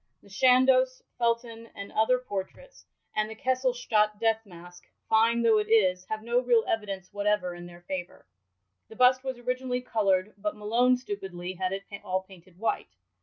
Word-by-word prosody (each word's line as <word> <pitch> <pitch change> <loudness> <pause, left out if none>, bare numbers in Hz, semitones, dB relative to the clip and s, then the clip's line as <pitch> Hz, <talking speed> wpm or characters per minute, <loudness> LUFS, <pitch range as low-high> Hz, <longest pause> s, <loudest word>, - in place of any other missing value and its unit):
The - - -18
Chandos, 255 +3 +4 0.2
Felton, 230 -1 -1
and 200 0 -8
other 220 +4 +3
portraits,^ 250 - -7 0.3
and 215 0 0
the 220 - -8
Kesselstadt 245 -4 +1
death 225 0 +1
mask— 175 0 -13 0.2
fine 230 +2 +3
though 225 -2 +5
it 210 - -3
is 185 -5 +3
— - - -35
hfive 215 0 -3
no 235 +2 +2
real 240 -3 +3
evidence 200 -3 -3
whatever 205 -3 0
in 175 0 -9
their 175 0 -13
favour. 175 0 -6 0.6
The - - -12
bust 255 +1 +4
was 260 -2 -4
originally 250 +1 -2
colourd, 205 -4 +1
but 210 +1 -3
Malone 240 +4 +3
stupidly 190 -6 -6
had 185 0 -2
it 195 0 -4 0.2
all 185 +1 -1
painted 185 -2 -17
white. 190 - -2
220 Hz, 170 wpm, -28 LUFS, 190-245 Hz, 0.6 s, though